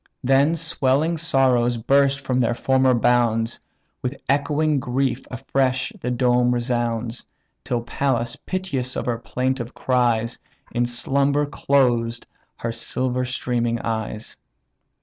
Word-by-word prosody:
Then 135 +5 +3
swelling 160 0 +1
sorrows 130 -6 +3
burst 140 +3 +2
their 125 -2 +1
former 130 +1 +3
bounds, 120 -1 +2 0.4
With 130 +2 -4
echoing 145 +2 +1
grief 130 +1 -1
afresh 130 - -1
the 125 - -2
dome 125 0 +2
resounds; 120 -1 -2 0.4
Till 125 -2 -1
Pallas, 120 -1 -1
piteous 140 -10 -4
of - - -3
her 120 -2 -1
plaintive 125 0 -2
cries, 120 -2 +1 0.3
In 120 0 0
slumber 140 +4 +1
closed 120 -5 +1 0.3
her 115 - -3
silver 125 +2 -2
streaming 120 -2 -1
eyes. 110 -1 -4
125 Hz, 110 wpm, -22 LUFS, 120-135 Hz, 0.4 s, Then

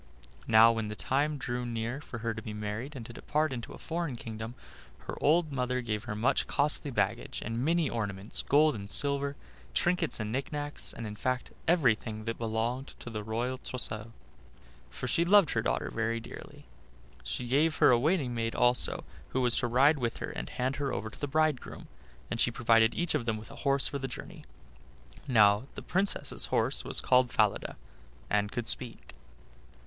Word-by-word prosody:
Now, 115 0 +7
when 115 -2 -2
the 105 - -5
time 145 +6 0
drew 125 -2 -3
near 120 +3 -3
for 120 - -8
her 115 - 0
to 110 - -6
be 110 -2 -6
married 105 +7 -5
and 120 -4 -7
to 120 - -9
depart 150 +3 -1
into 120 -3 -6
a - - -9
foreign 165 -5 -3
kingdom, 115 0 -7 0.5
her - - -6
old 160 +1 +3
mother 125 -1 -1
gave 105 -3 -3
her 105 - -4
much 120 +6 +1
costly 145 0 +1
baggage, 115 -3 -1
and 115 +2 -2
many 165 +1 +2
ornaments, 100 -4 -3
gold 150 +2 +5
and 100 -3 -7
silver, 140 +2 +2 0.4
trinkets 175 -5 +2
and 110 0 -3
knicknacks, 145 +3 -2
and, 115 - -7
in 105 -1 -6
fact, 130 +2 -2 0.2
everything 115 -9 +2
that 115 0 -3
belonged 115 +4 -2
to 120 -2 -9
a 105 - -2
royal 120 +4 -2
trousseau, 115 -3 -3 0.8
for 125 - -5
she 165 +8 +3
loved 190 -2 +5
her 110 - +1
daughter - - -1
very 115 0 -1
dearly. 115 - -11 0.6
She - - -4
gave 150 +5 +3
her - - +6
a 120 - +5
waiting 145 -3 +1
maid 115 -1 -2
also, 125 0 +3 0.3
who 130 - 0
was 120 -2 +3
to 120 - 0
ride 140 +5 +4
with 120 -2 -2
her - - -5
and - - -5
hand 130 +2 -2
her 140 -1 -1
over 110 - -4
to - - -15
the 145 - -2
bridegroom, 155 -2 -1 0.4
and 115 - -2
she - - +4
provided 115 -1 +3
each 175 -1 0
of 120 - -1
them 110 -1 0
with 110 - -10
a - - -10
horse 140 -1 +1
for 140 - -4
the 135 - -3
journey. - - -9 0.8
Now 105 -1 +5
the - - -7
Princess's 195 +2 0
horse - - +1
was - - 0
called 125 -1 +4
Falada, - - +1 0.5
and 105 0 +1
could 120 -2 -3
speak. 125 -3 +1
120 Hz, 190 wpm, -30 LUFS, 115-140 Hz, 0.8 s, Now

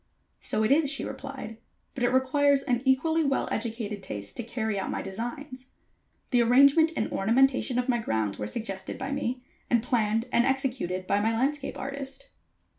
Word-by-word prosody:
"So 215 - -1
it 215 - +2
is," 290 0 +4
she 280 - -1
replied; 270 -4 -7 0.4
"but 260 - -4
it 245 - +4
requires 275 +2 +3
an 245 -1 0
equally 320 +5 +3
well 275 -2 0
educated 220 -2 -3
taste 100 - -7
to - - -1
carry 220 -3 -2
out 190 - -3
my - - -3
designs. 255 +6 -6 0.6
The 245 -2 +4
arrangement 280 +7 +5
and 215 - -1
ornamentation 250 +4 +2
of 250 0 0
my 240 -2 +2
grounds 110 - -1
were 105 - -3
suggested 195 - -5
by 265 +1 -4
me, 255 -3 -2 0.3
and 235 -2 +3
planned 225 -2 +1
and 235 - +4
executed 255 -9 -1
by 200 +2 +1
my 225 +1 +1
landscape 280 +3 -1
artist." 275 0 -6
250 Hz, 175 wpm, -27 LUFS, 220-275 Hz, 0.6 s, arrangement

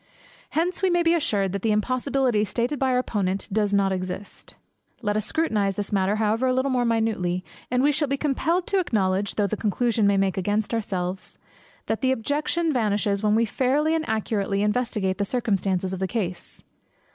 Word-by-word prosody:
Hence 355 +4 0
we 380 - +3
may 350 -1 +2
be 330 0 +4
assured 205 - +1
that 200 0 -3
the 220 - +1
impossibility 255 +1 +1
stated 240 +6 -1
by 265 - +2
our 250 - +2
Opponent 200 -6 -1
does 210 -1 +1
not 200 -1 +2
exist. 185 +1 -5 0.5
Let 205 -1 0
us 215 -1 -1
scrutinize 210 - 0
this 205 +1 -4
matter, 195 +1 +2
however, 220 +4 +1
a 255 - +2
little 260 +2 +1
more 250 -1 +1
minutely, 215 -6 0 0.2
and 250 +1 +1
we 290 - +5
shall 295 +1 0
be 275 +1 -1
compelled 320 +5 0
to 395 - +1
acknowledge, 200 - 0
though 205 - +2
the 200 - -1
conclusion 220 +1 +1
may 200 -1 +3
make 195 -1 +1
against 205 +4 0
ourselves, 190 -4 -3 0.5
that 220 - -2
the 260 - +2
objection 300 +6 0
vanishes 205 -4 +1
when 210 0 +2
we 230 +1 +3
fairly 275 +7 +1
and 320 -1 -1
accurately 205 -2 0
investigate 210 -3 0
the - - +2
circumstances 195 -5 0
of 190 - -4
the 190 - 0
case. 185 -5 -4
215 Hz, 190 wpm, -24 LUFS, 195-260 Hz, 0.5 s, we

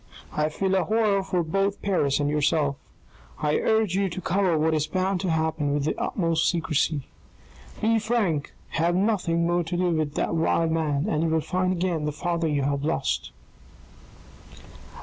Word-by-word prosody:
I 150 0 +1
feel 190 +5 -1
a 190 - +3
horror 215 -2 +2
for 185 -2 -1
both 195 +5 -1
Paris 150 -9 +1
and 145 - +1
yourself. 150 -1 +1 0.6
I 150 -1 +1
urge 220 -4 +2
you 195 0 +1
to 170 - -5
cover 185 -1 +1
what 160 +1 +2
is 155 -1 0
bound 185 +2 -1
to 190 - -1
happen 160 -3 0
with 145 - 0
the 155 - 0
utmost 165 -3 0
secrecy. 160 -3 0 0.8
Be 225 +1 +3
frank, 215 -10 0 0.2
have 170 +1 +1
nothing 185 -4 +1
more 175 +1 +1
to 170 +2 -3
do 180 0 +1
with 155 -3 -1
the - - +1
vile 165 0 +1
man, 155 -2 0
and 155 -7 0
you 165 - +1
will 160 0 +2
find 185 +3 -1
again 175 -4 -1
the 150 - -1
father 170 +2 -1
you 145 -2 0
have 140 0 -1
lost." 70 - -1
165 Hz, 175 wpm, -25 LUFS, 150-185 Hz, 0.8 s, a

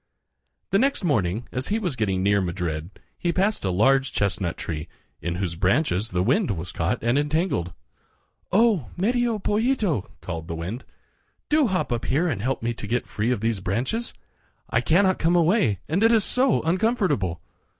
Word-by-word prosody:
The 195 - +4
next 275 -2 +1
morning, 110 - 0
as 130 +1 -3
he 210 - 0
was 180 -10 -2
getting 95 -5 0
near 100 0 +3
Madrid, 85 -3 -3 0.3
he 175 - 0
passed 195 +5 0
a 95 - 0
large 135 +9 +3
chestnut 95 -3 -1
tree, 75 -1 -4 0.3
in 85 0 -2
whose 90 -2 -2
branches 100 - +1
the 90 -3 0
wind 145 - +2
was 90 -2 -3
caught 85 +1 -1
and 120 +4 +2
entangled. 150 - 0 0.8
"Oh! 205 - +3
Medio 235 +4 +1
Pollito," 210 - 0
called 85 -2 -6
the 85 - -4
wind, 90 +10 -5 0.6
"do 300 -3 +4
hop 185 - -1
up 120 -1 -1
here 155 +7 +1
and 120 - -2
help 130 +1 -2
me 120 +1 0
to 105 - -7
get 120 +3 -1
free 105 +3 -2
of 125 -5 0
these 115 -2 0
branches. 125 - -2 0.6
I - - +2
cannot 185 +3 +3
come 165 +2 +2
away 165 - +3
and 180 +7 +1
it 225 - +6
is 225 -3 +4
so 255 +2 +2
uncomfortable." 180 - +1
130 Hz, 175 wpm, -24 LUFS, -, 0.8 s, it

